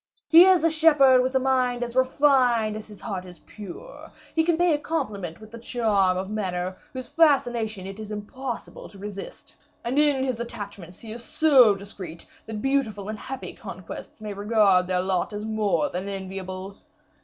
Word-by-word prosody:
He 335 +2 +9
is 370 -4 +5
a 330 - +5
shepherd 295 -5 +5
with 260 +1 -1
a - - +5
mind 255 -2 +1
as 240 0 -6
refined 255 -4 +3
as 215 0 -8
his 210 -2 -13
heart 195 -5 -4
is 180 -1 -12
pure; 210 - -11 0.2
he 320 - +3
can 335 0 +2
pay 350 -1 +3
a 295 - 0
compliment 200 - -4
with 215 +1 -14
a 230 - -8
charm 210 -6 +1
of 190 +1 -3
manner 185 -3 -3 0.2
whose 255 -3 -7
fascination 240 - +2
it 195 +2 -8
is 215 -1 -7
impossible 235 +4 -6
to 200 - -15
resist; 200 0 -9 0.3
and 255 +5 0
in 290 -3 +3
his 255 -3 -2
attachments 205 -7 -7
he 225 - -9
is 230 +1 -7
so 255 -6 +5
discreet, 190 -4 -8 0.2
that 215 -1 -5
beautiful 225 -7 0
and 215 0 -5
happy 265 0 -7
conquests - - -9
may 210 -1 -6
regard 200 -3 +3
their 180 -1 +1
lot 185 +2 -1
as 205 +1 -4
more 220 +5 +1
than 185 +3 -4
enviable. 190 0 -6
220 Hz, 180 wpm, -25 LUFS, 195-260 Hz, 0.3 s, He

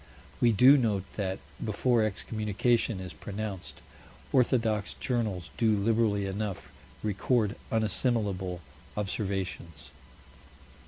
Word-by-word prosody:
We 120 - +5
do 125 +7 +7
note 105 -6 +1
that, 95 -2 -2 0.3
before 115 +2 +2
excommunication 110 +1 0
is 90 -1 -7
pronounced, 100 -2 -6 0.5
orthodox 115 -5 +2
journals 105 -9 -2
do 110 -2 +3
liberally 105 -1 +2
enough 100 0 -4 0.3
record 105 +1 +1 0.2
unassimilable 105 -5 0 0.4
observations. 95 -4 -3
105 Hz, 90 wpm, -29 LUFS, 95-115 Hz, 0.5 s, do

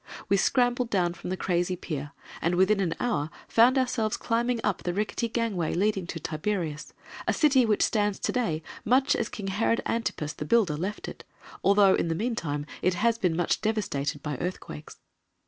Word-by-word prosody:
We 200 - +4
scrambled 245 +3 +2
down 180 -5 +1
from 175 - -8
the 185 - -2
crazy 180 0 0
pier, 145 -5 -5 0.3
and 170 +1 +1
within 190 +3 +3
an 175 -4 0
hour 160 -12 0 0.2
found 245 +4 +5
ourselves 240 -4 0
climbing 235 +1 0
up - - 0
the 175 0 -2
rickety 215 +3 -1
gangway 220 -8 -1
leading 195 -1 0
to 170 - -5
Tiberias, 155 -1 -3 0.3
a - - +3
city 270 -6 +4
which 210 -2 +2
stands 205 -2 +1
to - - -1
day 165 -11 -1 0.2
much 260 +5 +3
as 230 - -1
King 205 - -7
Herod 225 +4 +1
Antipas, 160 -10 -2
the - - -6
builder, 195 -4 +3
left 190 +7 -4
it, - - -9 0.4
although, 200 -1 +5
in - - +1
the 165 - -1
meantime, 165 -9 -2 0.2
it 185 0 +2
has 230 +5 +1
been 180 -6 +1
much 175 - +1
devastated 150 -10 -1
by 150 -3 -3
earthquakes. 175 - -6
195 Hz, 180 wpm, -27 LUFS, 170-230 Hz, 0.4 s, found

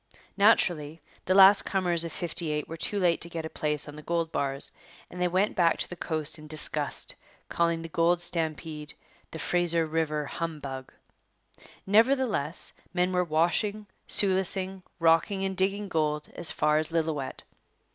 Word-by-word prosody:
Naturally, 170 -7 +3 0.3
the 185 - +2
last 195 +1 +8
comers 175 -3 +1
of 170 - -5
'58 155 -3 -2
were 165 - -6
too 205 +5 -1
late 175 -4 +2
to 170 - -2
get 165 -1 -5
a 160 - -6
place 150 -1 -1
on 145 - -9
the 150 - -9
gold 165 0 -2
bars, 140 0 -1 0.4
and 180 - -7
they 180 - +3
went 185 +4 +1
back 170 -2 +3
to - - -3
the 175 - -8
coast 160 -2 -2
in 155 - -11
disgust, 155 0 -2 0.4
calling 170 -1 0
the - - -5
gold 170 +2 +2
stampede 160 -3 -3 0.3
'the - - -8
Fraser 170 0 +1
River 155 -1 -1
humbug.' 140 -5 -5 0.9
Nevertheless, 220 - +1 0.2
men 180 +1 +2
were 180 0 +2
washing, 175 +6 0 0.2
sluicing, 190 -1 +1 0.2
rocking, 170 +4 +2
and 190 0 -2
digging 200 +2 0
gold 150 -3 -1
as 170 - +3
far 150 0 +2
as 155 +1 -4
Lillooet. 155 -5 -2
170 Hz, 155 wpm, -28 LUFS, 155-185 Hz, 0.9 s, last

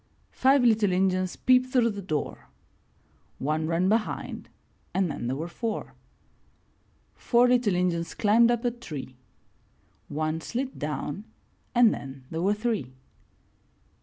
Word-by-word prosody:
Five 270 0 +4
little 220 -4 +4
Injuns 185 0 +1
peeped 255 0 +3
through 240 -3 +3
the 200 -1 -6
door 155 -6 -4 0.5
— - - -37
One 155 +1 0
ran 170 +3 +1
behind 215 +2 -1 0.5
and 190 -4 +1
then 120 - -4
there 130 - -1
were 160 +4 -4
four. 220 +5 -4 1.2
Four 245 0 +3
little 245 -6 +3
Injuns 175 -2 -1
climbed 230 +3 +4
up 240 0 0
a 240 - +2
tree 155 - -8 0.5
— - - -38
One 155 +2 -2
slid 260 +9 -4
down 150 +6 -4 0.5
and 240 -2 +6
then 135 -1 -8
there 165 0 -2
were 200 +3 +2
three. 210 - -2
195 Hz, 135 wpm, -27 LUFS, 160-235 Hz, 1.2 s, and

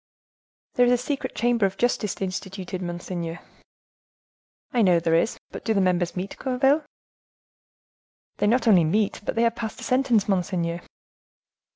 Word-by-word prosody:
"There 245 0 +4
is - - +4
a - - +4
secret 260 +1 -4
chamber 235 -4 +2
of 190 0 -8
justice 235 -4 0
instituted, 190 -1 -4
monseigneur." 175 -1 -5 1.3
"I 240 - +3
know 180 -5 +5
there 165 0 0
is, 165 +7 +2
but - - -8
do 220 - 0
the - - +3
members 180 -2 +1
meet, 190 +2 -5
Gourville?" 270 +4 +2 1.5
"They - - +1
not 235 +2 +2
only 190 -6 +6
meet, 205 +6 0
but - - -3
they 230 - +2
have 230 0 +2
passed 220 -2 -5
a - - -8
sentence, 250 -5 +2
monseigneur." 175 -3 -1
200 Hz, 155 wpm, -25 LUFS, 180-240 Hz, 1.5 s, only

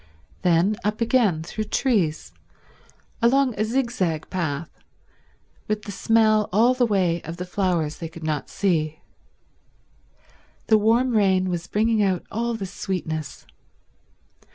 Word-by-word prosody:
Then 180 +3 +2
up 210 +1 -1
again 225 -9 +2
through 215 +6 -4
trees, 210 - 0 0.9
along 255 +2 +3
a - - +3
zigzag 225 - -1
path 165 -3 -3 1.0
with 215 0 -2
the 205 - -7
smell 215 +1 +2
all 230 +6 +4
the 250 -1 +2
way 180 -5 +1
of 165 +2 -7
the 180 - -4
flowers 180 -5 -1
they 165 - -6
could 165 0 -11
not 155 -2 -2
see. 155 -5 0 1.7
The 220 - +5
warm 230 +4 +3
rain 190 -3 +2
was 175 0 -3
bringing 220 +1 +1
out 190 -3 0
all 235 +2 -1
the 205 -3 -4
sweetness. 165 -5 -5
195 Hz, 130 wpm, -23 LUFS, 170-225 Hz, 1.7 s, The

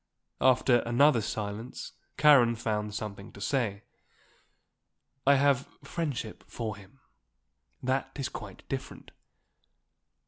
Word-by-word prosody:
After 130 -1 +5
another 120 +2 +4
silence 105 +3 -5 0.3
Karen 130 -6 +6
found 105 -2 -2
something 105 -2 -6
to - - -12
say. 105 -3 -1 1.4
"I 140 - +8
have 140 -1 +3 0.2
friendship 140 -7 -4
for 110 -3 -4
him. 100 +6 -16 0.8
That 130 +1 0
is 135 -2 -2
quite - - -9
different." - - -6
120 Hz, 100 wpm, -29 LUFS, 105-135 Hz, 1.4 s, I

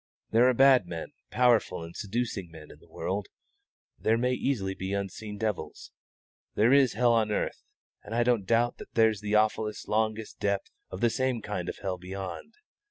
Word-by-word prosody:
There 120 +3 +5
are - - +3
bad 130 -6 +6
men, 85 -2 -6 0.2
powerful 115 -7 +2
and 85 +1 -10
seducing 105 -3 -3
men, 80 -2 -12
in - - -15
the - - -22
world; 100 +1 -3 0.7
there 110 +1 +2
may 125 +2 +1
easily 115 -8 -1
be 95 +1 -4
unseen 100 +1 -4
devils. 105 -2 -4 0.6
There 115 +5 +4
is 135 -4 +5
hell 120 +2 +3
on 110 -2 +2
earth, - - -2 0.4
and 110 +2 -6
I 120 - +3
don't 120 -5 +1
doubt 115 +1 +2
but - - -9
that - - -43
there's 110 -3 +3
the 105 0 -1
awfulest, 105 0 +1
longest 110 0 -1
depth 100 -1 -1 0.2
of 95 - -7
the 120 -1 +3
same 130 -2 0
kind 90 -4 -3
of - - -5
hell 95 -2 -2
beyond. 95 - -7
110 Hz, 185 wpm, -28 LUFS, 95-120 Hz, 0.7 s, bad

